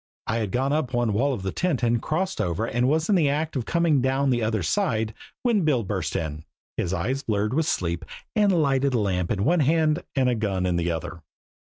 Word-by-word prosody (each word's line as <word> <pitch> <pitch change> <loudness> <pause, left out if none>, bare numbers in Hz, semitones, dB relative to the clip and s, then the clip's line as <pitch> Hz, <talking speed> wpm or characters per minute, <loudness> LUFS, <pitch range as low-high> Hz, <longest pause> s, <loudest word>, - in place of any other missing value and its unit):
I 115 - -1
had 110 -3 -1
gone 135 +3 0
up 140 -5 -1
one 120 -3 +1
wall 135 +7 +2
of 105 -8 -4
the 95 - -2
tent 170 -9 -1
and 120 0 +3
had - - -6
crossed 185 - -1
over 100 +3 -1
and 120 +2 0
was 160 +2 +1
in 210 - +3
the 165 -7 +3
act 155 +2 -1
of 125 -4 -2
coming 170 -5 +2
down 135 +1 +1
the 120 -1 +1
other 110 -3 0
side 110 +7 0 0.3
when 235 -5 +3
Bill 145 -8 +2
burst 95 - -3
in, 80 -1 -3 0.3
his 85 - -2
eyes 115 +10 -1
blurred 105 -2 -1
with 160 +2 +1
sleep, 85 - -1 0.3
a 210 -2 +4
lighted 140 -7 +2
lamp 95 -6 0
in 100 -1 0
one 175 +5 +3
hand 155 +2 +2
and 130 -2 +2
a 125 - +3
gun 100 -5 -1
in 90 -1 +1
the 85 0 0
other. 85 0 -4
125 Hz, 230 wpm, -25 LUFS, 100-150 Hz, 0.3 s, a